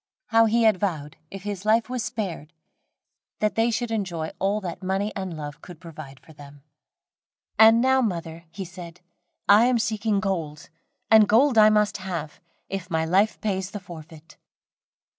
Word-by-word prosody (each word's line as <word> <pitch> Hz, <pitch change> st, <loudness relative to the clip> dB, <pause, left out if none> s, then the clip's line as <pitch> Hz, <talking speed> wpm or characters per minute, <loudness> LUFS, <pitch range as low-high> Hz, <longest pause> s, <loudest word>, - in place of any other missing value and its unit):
How 225 Hz, -1 st, +5 dB
he 230 Hz, +1 st, +2 dB
had 215 Hz, -4 st, +3 dB
vowed, 155 Hz, -6 st, -3 dB
if 195 Hz, -1 st, -9 dB
his 205 Hz, -2 st, -5 dB
life 220 Hz, +2 st, +2 dB
was 250 Hz, -2 st, -3 dB
spared, 195 Hz, -8 st, -5 dB, 0.8 s
that 215 Hz, 0 st, 0 dB
they 225 Hz, +1 st, +1 dB
should 235 Hz, 0 st, -2 dB
enjoy 175 Hz, -7 st, -3 dB
all 200 Hz, +2 st, 0 dB
that 175 Hz, -3 st, -6 dB
money 195 Hz, +3 st, -2 dB
and 190 Hz, -4 st, -5 dB
love 150 Hz, +1 st, -8 dB
could 175 Hz, -3 st, -12 dB
provide 155 Hz, -6 st, -11 dB
for 160 Hz, -, -18 dB
them. 145 Hz, -1 st, -15 dB, 1.0 s
"And 225 Hz, +1 st, +7 dB
now, 265 Hz, +1 st, +3 dB
mother," 170 Hz, -6 st, -4 dB
he 185 Hz, +4 st, -7 dB
said, 175 Hz, -1 st, -11 dB, 0.5 s
"I 210 Hz, +3 st, +6 dB
am 250 Hz, -1 st, +2 dB
seeking 215 Hz, -2 st, -1 dB
gold, 165 Hz, -7 st, -4 dB, 0.4 s
and 220 Hz, -2 st, +6 dB
gold 250 Hz, +4 st, +4 dB
I 215 Hz, -1 st, +7 dB
must 210 Hz, -1 st, +1 dB
have, 180 Hz, -5 st, -6 dB, 0.3 s
if 195 Hz, -2 st, -6 dB
my 160 Hz, -2 st, 0 dB
life 195 Hz, +6 st, +1 dB
pays 190 Hz, -3 st, -2 dB
the 205 Hz, 0 st, -7 dB
forfeit." 165 Hz, -2 st, -13 dB
195 Hz, 165 wpm, -24 LUFS, 165-220 Hz, 1.0 s, And